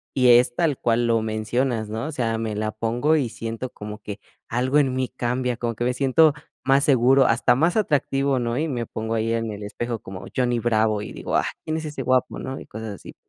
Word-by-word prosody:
y 125 -1 +4
es 125 0 +3
tal 155 -4 +1
cual 120 0 +1
lo 115 -1 +2
mencionas, 110 +1 -1
¿no? 110 +3 -3
O 155 - -4
sea, 115 -6 -1
me 110 -1 -3
la 110 +1 -2
pongo 120 +8 +1
y 135 -6 +1
siento 115 +2 -5
como 105 0 -8
que 105 0 -6 0.3
algo 130 +4 +1
en 135 -3 +3
mí 130 0 -1
cambia, 125 0 -2
como 120 0 -2
que 115 - -4
me 125 - +1
siento 145 +4 +4 0.3
más 135 +1 +3
seguro, 135 -1 +5
hasta 120 +1 +3
más 165 +7 +2
atractivo, 140 -7 +1
¿no? 120 -1 -1
Y 160 - 0
me 120 -5 -2
pongo 110 +1 -4
ahí 115 +1 0
en 115 -1 -1
el 105 0 -7
espejo 120 +3 -4
como 95 -1 -9
Johnny 120 -2 +1
Bravo 110 -2 +1
y - - -7
digo: - - -4
"Ah, - - +2 0.2
¿quién 155 0 -1
es 160 - -5
ese 145 -3 -5
guapo", 130 0 +1
¿no? 130 +1 -5
Y - - -11
cosas 110 +1 -7
así. - - -12
120 Hz, 230 wpm, -23 LUFS, 110-135 Hz, 0.3 s, seguro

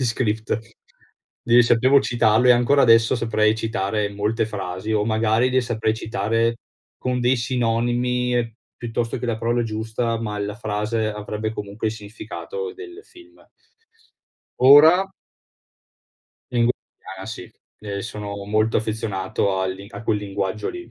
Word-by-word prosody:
gli - - +1
script. 110 -2 -1 0.9
Glieli 120 +1 +6
sapevo 130 +4 +4
citarlo 120 0 +2
e - - +9
ancora 125 +4 +3
adesso 115 +1 +5
saprei 110 -2 +2
citare 105 -2 -1
molte 105 +2 -1
frasi, 95 0 -4
o 105 -1 +1
magari 110 +3 +2
le 130 0 +3
saprei 115 -2 -1
citare 115 +2 -1 0.4
con 125 -1 -1
dei 125 +2 +3
sinonimi, 120 0 0 0.2
piuttosto 115 0 -3
che 125 - -4
la 115 -2 -1
parola 120 +1 0
giusta, 115 +1 -2
ma 105 -2 -4
la 105 0 -3
frase 110 0 -2
avrebbe 105 +1 -4
comunque 105 +1 -4
il - - -3
significato 260 - -7
del 390 -1 -10
film. 345 -2 -18 1.2
Ora 155 +8 +7 1.4
Lingu 120 -1 +2 0.5
ah 95 - -8
sì. 110 -5 -8 0.3
Ehm, 100 -1 -5
sono 100 -2 -6
molto 110 +2 +1
affezionato 100 -3 -2
al 95 0 -1
li 100 +1 -11
a 100 - -8
quel 110 -1 0
linguaggio 100 0 -3
lì. 350 0 -9
115 Hz, 140 wpm, -22 LUFS, 105-120 Hz, 1.4 s, e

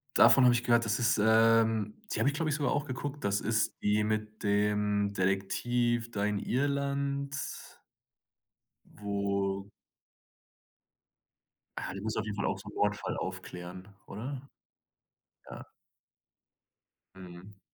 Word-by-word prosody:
Davon 135 - +7
habe 125 -1 +6
ich 120 0 0
gehört, 120 -1 +3
das 110 - 0
ist, 115 -2 +2
ähm 110 -1 +4 0.2
die - - -1
habe - - +2
ich, 140 - +2
glaube 160 0 -1
ich, 150 - +1
sogar 145 -2 0
auch 145 +1 0
geguckt, 145 +2 -5
das 100 0 +1
ist 110 0 -1
die 105 +1 +2
mit 110 0 -3
dem 105 0 +1
Detektiv 115 +5 0
da 100 -2 -2
in 105 -1 0
Irland? 140 +1 -1 1.5
Wo 100 -1 -2 2.1
Ah, - - -4
die 100 - -6
muss 110 +1 -3
auf - - -1
jeden 105 -1 -4
Fall 100 - -2
auch 95 - 0
so 105 +1 -10
'nen - - -13
Mordfall 105 +1 -1
aufklären, 90 +2 -7 0.2
oder? 125 +6 -6 1.1
Ja. - - -8 1.5
Mhm. 95 +2 -12
105 Hz, 130 wpm, -30 LUFS, 100-120 Hz, 2.1 s, Davon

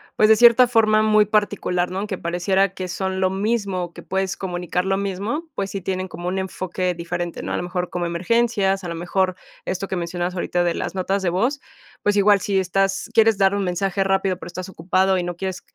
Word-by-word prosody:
pues, 215 - +4
de 220 - +7
cierta 240 +1 +7
forma 215 -2 +4
muy 215 -1 +4
particular, 205 -4 0
¿no?, 195 +3 -3
que 195 -3 -3
pareciera 185 +3 0
que 185 -1 -5
son 190 +1 -3
lo 185 0 +2
mismo, 195 -3 -1
que - - -11
puedes 190 0 -2
comunicar 180 -1 -2
lo 195 0 +1
mismo, 200 - -3
pues, 195 -1 -3
sí 195 - -4
tienen 185 0 -3
como 175 -1 -5
un 190 +1 -1
enfoque 185 -1 -2
diferente, 170 0 -4
¿no? - - -4
A - - -1
lo - - -3
mejor 180 0 -3
como 175 -1 -2
emergencias, 195 +2 +1
a - - -3
lo 170 - -4
mejor 185 +2 0 0.3
esto 195 +1 -3
que 190 - -2
mencionabas 175 +1 -3
ahorita 175 0 0
de 175 -1 +1
las - - -4
notas 190 +1 -1
de 180 - +2
voz, 235 +11 0 0.4
pues, 205 0 +1
igual 205 0 +5
si 195 +1 -1
estás 195 +2 0
quieres 225 -2 +4
dar 195 0 +3
un 200 -1 -1
mensaje 185 +2 -1
rápido, 195 -1 +1
pero - - -8
estás 180 +2 -7
ocupado 190 +2 +1
y 180 - -1
no 175 0 -4
quieres, 190 +1 -4
190 Hz, 220 wpm, -22 LUFS, 180-200 Hz, 0.4 s, de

